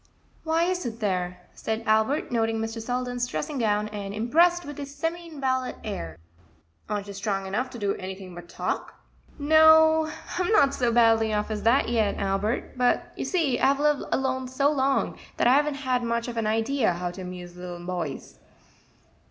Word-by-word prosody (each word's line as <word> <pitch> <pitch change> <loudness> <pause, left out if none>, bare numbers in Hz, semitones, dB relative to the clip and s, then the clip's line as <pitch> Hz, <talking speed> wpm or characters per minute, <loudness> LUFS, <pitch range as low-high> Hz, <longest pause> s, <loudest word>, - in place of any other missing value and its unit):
"Why 325 +1 +2
isn't 345 -11 -2
there?" 180 -4 -2
said 220 +1 -3
Albert, 220 +8 +2
noting 225 -1 +1
Mr. 225 +1 -3
Selden's 245 +1 -2
dressing 290 +2 -3
gown, 210 -2 +1
and 200 -1 -6
impressed 340 +10 +3
with 290 0 -8
his 280 0 -7
semi 330 +3 -3
invalid 260 -5 -2
air; 85 - -5 0.7
"aren't 205 -1 -2
you 200 - -8
strong 195 0 -2
enough 215 +7 -2
to 245 - -9
do 205 -3 0
anything 190 -1 -7
but 175 0 -10
talk?" - - -3 0.4
"No, 315 +1 +6 0.3
I'm 360 +3 +1
not 280 -11 +5
so 245 -4 +1
badly 225 -1 +4
off 210 +1 -1
as 210 -1 -3
that 235 +5 +3
yet, 225 -3 +1
Albert; 200 +7 -1
but 245 0 +1
you - - -4
see 315 -10 +1
I've 275 +1 +3
lived 295 -1 +2
alone 260 -1 0
so 275 +3 +2
long; 270 -1 0 0.2
that - - +2
I 245 - +6
haven't 275 -4 +1
much 235 +1 -1
of 240 - -5
an 225 -2 -1
idea 225 0 +1
how 175 +1 -3
to 185 - -9
amuse 180 -1 -8
little 175 -1 -8
boys." 175 -6 -5
235 Hz, 175 wpm, -26 LUFS, 205-280 Hz, 0.7 s, No